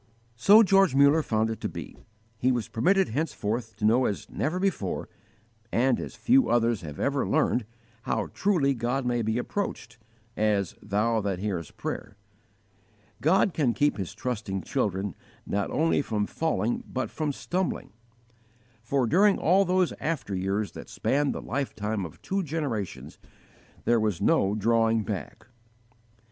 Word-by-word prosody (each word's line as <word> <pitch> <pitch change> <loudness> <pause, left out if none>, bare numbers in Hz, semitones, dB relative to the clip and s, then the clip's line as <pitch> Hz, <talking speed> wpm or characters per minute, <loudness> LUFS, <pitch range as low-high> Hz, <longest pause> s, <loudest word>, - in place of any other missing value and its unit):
So 205 - +7
George 195 -7 +4
Muller 140 +3 +5
found 110 -5 0
it 110 - -6
to - - -2
be. - - -8 0.4
He 130 +2 +3
was 120 -4 -1
permitted 190 - +2
henceforth 115 -5 -2
to 105 +1 -2
know 120 +4 +4
as 100 - -2
never 160 +5 -1
before, 185 - -2 0.6
and 125 +1 +2
as - - -6
few 260 +1 +3
others 115 -3 +2
have 75 -3 -8
ever 140 -1 +1
learned, 135 -6 +2 0.4
how - - -2
truly 170 -9 +2
God 125 +2 -1
may 120 -1 +1
be 110 +1 0
approached 120 - -4 0.4
as 105 -4 +1
"Thou 110 +2 +1
that 100 -2 -2
hearest 90 -5 -4
prayer." - - -5 1.0
God 185 +4 +3
can 130 -7 +1
keep 145 0 +2
His 95 -4 -5
trusting 105 -6 -3
children 100 - -1 0.3
not 100 0 -1
only 160 -1 +2
from 105 -6 -1
falling 120 -7 -1
but 130 - -2
from 155 -2 -2
stumbling; 180 +6 -3 0.9
for, 125 +3 0
during 195 - +4
all 190 +4 +3
those 185 -1 +2
after 155 -10 -2
years 95 +3 -1
that - - -10
spanned 145 +1 0
the - - -5
lifetime 110 -7 -2
of 75 - -17
two 195 +1 -1
generations, 145 - -4 0.7
there 120 -1 +4
was 105 -5 0
no 100 +2 +2
drawing 115 +1 +2
back. 105 +2 -6
120 Hz, 150 wpm, -27 LUFS, 105-155 Hz, 1.0 s, So